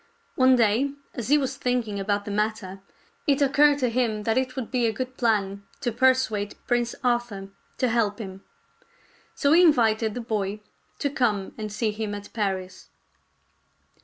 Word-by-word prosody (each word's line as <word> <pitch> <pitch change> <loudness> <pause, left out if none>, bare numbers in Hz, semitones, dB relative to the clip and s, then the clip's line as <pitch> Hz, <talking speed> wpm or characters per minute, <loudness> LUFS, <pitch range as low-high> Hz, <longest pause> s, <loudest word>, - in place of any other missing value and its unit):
One 260 0 +5
day 240 +4 +2 0.2
as 240 -4 -5
he 295 +3 +5
was 265 -2 -1
thinking 240 -5 -1
about 205 +1 -1
the 205 - -5
matter, 210 -2 -2 0.5
it 280 -1 +3
occurred 290 +1 +4
to 250 - +2
him 225 -3 0
that 225 +1 +1
it 255 0 0
would 260 -4 -5
be 245 -3 +2
a - - +1
good 255 +2 -5
plan 200 -5 0 0.2
to 240 - 0
persuade 230 -4 +1
Prince 240 -1 0
Arthur 240 -6 -1 0.3
to 255 - +1
help 225 -3 +1
him. 195 -3 -8 0.9
So 285 0 +3
he 345 - +7
invited 225 -9 +3
the 245 - -3
boy 210 -2 -2 0.4
to 285 - -1
come 220 -9 0
and 215 -1 -5
see 215 +1 -1
him 210 -1 -4
at 205 0 -10
Paris. 190 -4 -3
225 Hz, 165 wpm, -25 LUFS, 205-255 Hz, 0.9 s, he